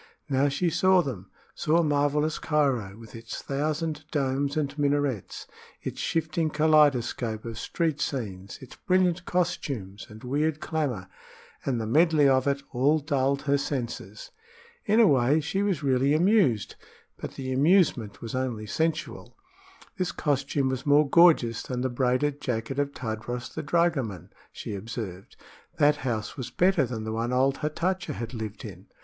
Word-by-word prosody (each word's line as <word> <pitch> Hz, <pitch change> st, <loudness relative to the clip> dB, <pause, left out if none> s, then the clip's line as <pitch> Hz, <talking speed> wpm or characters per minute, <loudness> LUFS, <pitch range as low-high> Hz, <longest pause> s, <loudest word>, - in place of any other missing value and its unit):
Now 140 Hz, 0 st, +2 dB
she 170 Hz, +5 st, 0 dB
saw 185 Hz, +2 st, +4 dB
them 100 Hz, -, -6 dB, 0.2 s
saw 165 Hz, +2 st, +2 dB
marvelous 150 Hz, +1 st, +1 dB
Cairo, 130 Hz, -10 st, 0 dB
with 115 Hz, -1 st, -13 dB
its 115 Hz, 0 st, -7 dB
thousand 155 Hz, +2 st, -2 dB
domes 140 Hz, 0 st, -1 dB
and 145 Hz, -2 st, -1 dB
minarets, 145 Hz, -6 st, -1 dB, 0.4 s
its -, -, -5 dB
shifting 160 Hz, 0 st, -1 dB
kaleidoscope 145 Hz, -8 st, +2 dB
of 115 Hz, -1 st, -6 dB
street 160 Hz, 0 st, -1 dB
scenes, 100 Hz, -10 st, -4 dB
its 130 Hz, -, -12 dB
brilliant 180 Hz, -1 st, +1 dB
costumes 135 Hz, -, -2 dB
and 110 Hz, 0 st, -12 dB
weird 150 Hz, +4 st, 0 dB
clamor 140 Hz, -, -2 dB, 0.6 s
and 125 Hz, -4 st, -1 dB
the 110 Hz, -, -2 dB
medley 155 Hz, +4 st, +4 dB
of 130 Hz, 0 st, +3 dB
it 140 Hz, 0 st, 0 dB
all 140 Hz, +5 st, +3 dB
dulled 140 Hz, -2 st, 0 dB
her 140 Hz, -1 st, +2 dB
senses. 140 Hz, -, -5 dB, 0.5 s
In 215 Hz, +2 st, +3 dB
a 230 Hz, -, +7 dB
way 140 Hz, -2 st, +4 dB
she 160 Hz, +6 st, -2 dB
was 195 Hz, -7 st, 0 dB
really 135 Hz, +1 st, +2 dB
amused; 170 Hz, -, +3 dB, 0.4 s
but -, -, -7 dB
the 130 Hz, -1 st, -4 dB
amusement 140 Hz, -, +2 dB
was 115 Hz, -, -6 dB
only 125 Hz, -4 st, -2 dB
sensual. 160 Hz, +8 st, -3 dB, 0.6 s
This 185 Hz, -, 0 dB
costume 140 Hz, -2 st, 0 dB
was 130 Hz, -1 st, -3 dB
more 145 Hz, +1 st, +4 dB
gorgeous 140 Hz, -8 st, +5 dB
than 125 Hz, -1 st, -4 dB
the 130 Hz, -, 0 dB
braided 130 Hz, +3 st, 0 dB
jacket 125 Hz, +2 st, -3 dB
of 140 Hz, 0 st, 0 dB
Tadros 120 Hz, 0 st, -5 dB
the 160 Hz, -, -4 dB
dragoman, 140 Hz, -, 0 dB, 0.2 s
she -, -, -7 dB
observed; 100 Hz, -2 st, -7 dB, 0.4 s
that 150 Hz, 0 st, +4 dB
house 115 Hz, -6 st, -3 dB
was 130 Hz, -4 st, -5 dB
better 180 Hz, -7 st, +2 dB
than 115 Hz, -2 st, -5 dB
the 110 Hz, 0 st, -4 dB
one 115 Hz, +2 st, -2 dB
old 135 Hz, +2 st, +2 dB
Hatatcha 170 Hz, +2 st, -2 dB
had 115 Hz, -2 st, -6 dB
lived 110 Hz, -3 st, -6 dB
in. -, -, -10 dB
140 Hz, 155 wpm, -27 LUFS, 120-155 Hz, 0.6 s, a